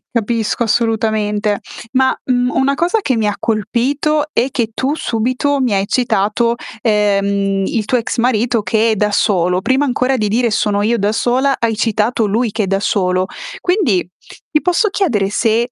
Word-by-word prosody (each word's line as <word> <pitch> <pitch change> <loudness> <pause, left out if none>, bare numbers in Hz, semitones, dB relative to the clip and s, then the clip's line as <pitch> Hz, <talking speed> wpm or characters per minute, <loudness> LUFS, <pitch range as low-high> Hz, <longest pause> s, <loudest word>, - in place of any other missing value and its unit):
Capisco, 230 +1 0
assolutamente. 215 -2 0 0.3
Ma, 260 0 +2
mhmm, 250 -1 +1
una 275 +1 +1
cosa 350 +8 +1
che 260 - 0
mi 220 -1 +1
ha 205 - -1
colpito 270 +7 0
è 240 -1 +1
che 235 -4 -1
tu 265 +6 -1
subito 255 +3 -1
mi 250 -5 +1
hai 195 0 +1
citato, 230 -1 +1 0.3
ehm, 200 -2 +1
il 220 +2 -1
tuo 250 +4 0
ex 230 - -3
marito 235 -1 +1
che 225 +1 +2
è - - +1
da 210 0 0
solo. 180 -3 +1
Prima 260 +8 +1
ancora 260 -1 0
di 215 -4 -1
dire: 235 +1 +1
"Sono 205 -1 0
io 235 +3 +1
da 205 0 0
sola." 255 +5 +1
Hai 230 -1 0
citato 220 +1 0
lui 220 +2 0
che 220 0 -1
è 195 - -2
da 195 +1 0
solo. 185 -3 0 0.3
Quindi 315 - +1 0.4
ti 305 - +2
posso 360 +5 +2
chiedere 290 - 0
se, 230 +3 +1
225 Hz, 175 wpm, -16 LUFS, 210-255 Hz, 0.4 s, Ma